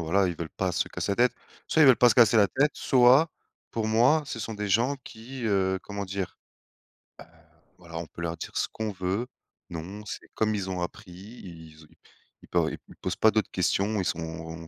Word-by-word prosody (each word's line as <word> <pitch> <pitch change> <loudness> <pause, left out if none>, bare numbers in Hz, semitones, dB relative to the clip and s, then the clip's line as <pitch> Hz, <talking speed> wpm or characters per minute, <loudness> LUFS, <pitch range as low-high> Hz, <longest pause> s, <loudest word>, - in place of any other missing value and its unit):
voilà, 95 +4 +2
ils 90 - -2
veulent 80 0 -5
pas 95 -2 -2
se - - 0
casser 100 - -2
la - - -3
tête. - - -27 0.3
Soit 160 - +3
ils - - +8
veulent 130 -3 +8
pas 125 - +6
se 115 - +3
casser 115 -2 +6
la 100 -2 +5
tête, 145 +3 +2
soit 130 +5 +5 0.4
pour 115 -1 -2
moi 120 +8 +4
ce 130 - -6
sont 110 - -4
des 105 0 -3
gens 120 +8 +2
qui, 120 +3 -9
heu, 95 -3 +1
comment 100 0 -5
dire, 95 -1 -5 1.2
ben - - -34 0.2
voilà, 85 -2 -9
on 85 - -4
peut 80 - -11
leur 85 0 -3
dire - - -7
ce - - 0
qu'on 110 -1 -3
veut, 95 +4 -2 0.5
non 95 +6 -7
c'est - - -7
comme 110 -1 +1
ils 95 -2 -3
ont 90 -1 -3
appris, 95 +2 -7
ils 85 -5 -12
o - - -22 0.6
ils - - -15
po - - +1
ils - - -11
posent - - -2
pas 110 - +4
d'autres 110 -3 0
questions, 100 +4 0
ils 95 - -1
sont 80 -1 -5
100 Hz, 215 wpm, -27 LUFS, 90-115 Hz, 1.2 s, ils